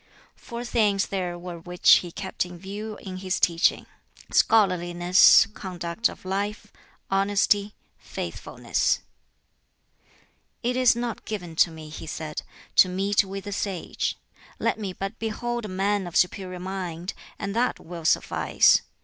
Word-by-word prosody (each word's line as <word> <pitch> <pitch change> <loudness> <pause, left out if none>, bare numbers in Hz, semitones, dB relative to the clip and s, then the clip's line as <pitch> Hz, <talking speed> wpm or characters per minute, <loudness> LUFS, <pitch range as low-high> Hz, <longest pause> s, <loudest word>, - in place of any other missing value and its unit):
Four 235 +1 -8
things 210 -4 +2
there 180 -3 -3
were 175 -1 -7
which 180 +1 +5
he 175 - -5
kept 190 +2 -3
in 180 0 -9
view 205 +4 -6
in 185 -2 -6
his 185 0 -2
teaching 170 -1 +2 0.5
scholarliness, 180 -4 +5
conduct 180 +2 -2
of - - -12
life, 205 +2 -3 0.4
honesty, 200 +1 +2 0.2
faithfulness. - - -2 1.6
"It 245 +1 0
is 255 -2 +5
not 235 -1 -4
given 180 -6 -5
to 170 - +5
me," 160 -1 -10
he 155 +1 -8
said, 155 -1 -5 0.4
"to 185 - +7
meet 195 +3 +2
with 195 0 -7
a 205 - -5
sage; 195 -3 -3 0.4
let - - 0
me 200 -3 -3
but 195 +4 -6
behold 240 +1 -3
a 185 -3 -6
man 200 -1 +1
of 175 - -9
superior 185 0 0
mind, 180 -1 -5 0.2
and 200 0 -4
that 245 +2 +1
will 170 -1 -9
suffice. 155 - +3
195 Hz, 140 wpm, -25 LUFS, 175-205 Hz, 1.6 s, to